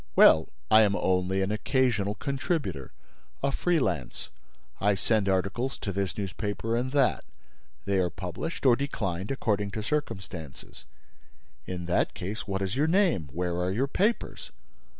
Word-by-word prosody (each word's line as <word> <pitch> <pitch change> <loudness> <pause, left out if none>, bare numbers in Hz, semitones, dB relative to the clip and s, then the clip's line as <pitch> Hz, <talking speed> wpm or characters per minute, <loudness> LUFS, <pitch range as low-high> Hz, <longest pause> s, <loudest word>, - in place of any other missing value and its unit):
"Well, 80 0 +7 0.2
I 110 - +8
am 100 -2 +3
only 95 +1 +1
an 95 - -1
occasional 115 -3 +1
contributor, 135 - -2 0.5
a - - +2
free 175 +5 +1
lance. 85 - -2 0.5
I 100 0 +3
send 100 +1 +1
articles 100 +8 0
to 100 - -4
this 100 +1 -2
newspaper 105 +3 -2
and 125 +2 -1
that. 140 -3 +3 0.6
They 100 -1 +1
are 90 -1 +2
published 95 - -5
or 125 -3 +7
declined 100 -9 -3
according 105 -6 0
to 110 - -2
circumstances." 95 - -4 0.8
"In 90 -1 -4
that 90 +1 +1
case, 105 +5 -5
what 95 -1 -1
is 95 +3 -2
your 145 +4 +2
name? 165 - +2
Where 85 +1 -1
are 90 +1 0
your 120 +8 +1
papers?" 210 +10 -1
100 Hz, 150 wpm, -28 LUFS, 90-130 Hz, 0.8 s, I